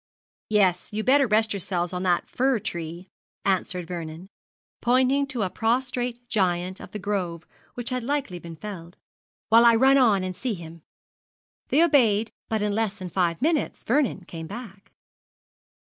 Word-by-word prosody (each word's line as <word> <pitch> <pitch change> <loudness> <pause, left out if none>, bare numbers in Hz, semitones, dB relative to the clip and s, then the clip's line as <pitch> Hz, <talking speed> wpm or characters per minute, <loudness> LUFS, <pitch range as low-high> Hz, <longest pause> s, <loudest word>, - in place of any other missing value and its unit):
'Yes, 190 -4 +2
you'd 215 +1 -3
better 275 +1 +5
rest 220 0 +2
yourselves 180 -2 -2
on 180 - -2
that 180 -2 +1
fir 260 0 +1
tree,' 170 -2 -5 0.4
answered 180 -2 0
Vernon, 170 +1 -7 0.5
pointing 260 +3 +3
to 250 -5 -2
a 190 - -1
prostrate 245 +1 -1
giant 185 -3 0
of - - -10
the - - -6
grove 185 -5 -3 0.3
which 245 +1 -3
had 255 0 -1
been 235 - -8
lately 275 -11 -2 0.2
felled, 175 -1 -9 0.5
'while 230 +1 +7
I 235 -1 +7
run 265 +4 +5
on 210 -7 +4
and 185 0 -4
see 235 +2 -2
him.' 165 -1 -11 0.9
They 310 +5 +4
obeyed, 230 -9 +3 0.2
but 220 -2 0
in 210 -1 0
less 220 -2 0
than 185 -2 -8
five 175 +1 0
minutes 315 -1 0
Vernon 240 -7 0
came 165 -1 -7
back. 205 -2 -10
210 Hz, 160 wpm, -25 LUFS, 180-245 Hz, 0.9 s, while